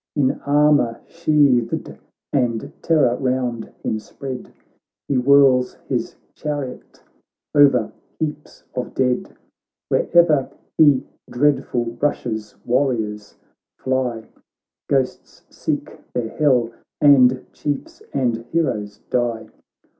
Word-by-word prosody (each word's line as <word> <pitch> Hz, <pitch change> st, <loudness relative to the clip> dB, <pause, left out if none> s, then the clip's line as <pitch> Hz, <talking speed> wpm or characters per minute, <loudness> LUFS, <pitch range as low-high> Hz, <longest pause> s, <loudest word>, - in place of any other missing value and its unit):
In 140 Hz, -3 st, +3 dB, 0.2 s
armour 145 Hz, -5 st, +3 dB
sheathed, 145 Hz, -7 st, +1 dB, 0.4 s
and 120 Hz, -5 st, 0 dB
terror 150 Hz, -7 st, +3 dB
round 125 Hz, -3 st, -2 dB
him 110 Hz, -, -1 dB
spread. 130 Hz, +4 st, -8 dB, 0.6 s
He -, -, 0 dB
whirls 130 Hz, -1 st, +4 dB
his -, -, -2 dB, 0.2 s
chariot 145 Hz, -4 st, -6 dB, 0.5 s
over 145 Hz, -1 st, +5 dB, 0.3 s
heaps 150 Hz, -2 st, -5 dB
of 125 Hz, -, -4 dB
dead; 125 Hz, -1 st, 0 dB, 0.5 s
Where'er 160 Hz, -5 st, +3 dB, 0.3 s
he 145 Hz, -4 st, +5 dB, 0.2 s
dreadful 120 Hz, -3 st, 0 dB
rushes, 110 Hz, -7 st, -2 dB
warriors 115 Hz, -5 st, -1 dB, 0.4 s
fly, 125 Hz, -4 st, -1 dB, 0.6 s
Ghosts 135 Hz, -2 st, -2 dB
seek -, -, -3 dB, 0.2 s
their 120 Hz, -2 st, -1 dB
hell, 125 Hz, -6 st, +2 dB, 0.3 s
and 130 Hz, -3 st, +5 dB
chiefs 145 Hz, -2 st, -4 dB
and 125 Hz, -4 st, 0 dB
heroes 105 Hz, -11 st, -1 dB
die. 120 Hz, -2 st, -1 dB
130 Hz, 95 wpm, -21 LUFS, 120-145 Hz, 0.6 s, over